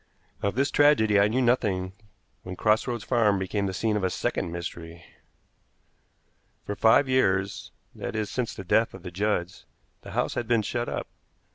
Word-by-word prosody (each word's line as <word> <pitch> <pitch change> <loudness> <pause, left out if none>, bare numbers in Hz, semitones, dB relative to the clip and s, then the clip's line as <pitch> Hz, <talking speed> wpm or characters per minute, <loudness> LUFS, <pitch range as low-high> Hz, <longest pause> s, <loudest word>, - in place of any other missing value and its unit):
Of 100 +1 -1
this 140 +2 +1
tragedy 110 -9 +4
I 100 - +5
knew 125 +5 0
nothing 100 -7 +1 0.5
when 95 0 -7
Cross 110 +5 +2
Roads 120 -3 -3
Farm 105 -2 +2
became 100 +1 -2
the - - -2
scene 105 +3 -1
of 105 - -1
a 95 - +2
second 85 - -2
mystery. 85 0 -7 1.6
For 105 - -4
five 115 +7 +4
years 100 -7 0 0.2
that - - -6
is, 110 -1 -2
since 125 -3 -3
the - - -7
death 110 +5 +2
of - - -12
the 90 - -7
Judds 95 -1 -2 0.3
the - - -10
house - - 0
had 120 - -3
been 115 -2 +2
shut 120 +2 -2
up. - - -3
105 Hz, 175 wpm, -26 LUFS, 95-120 Hz, 1.6 s, I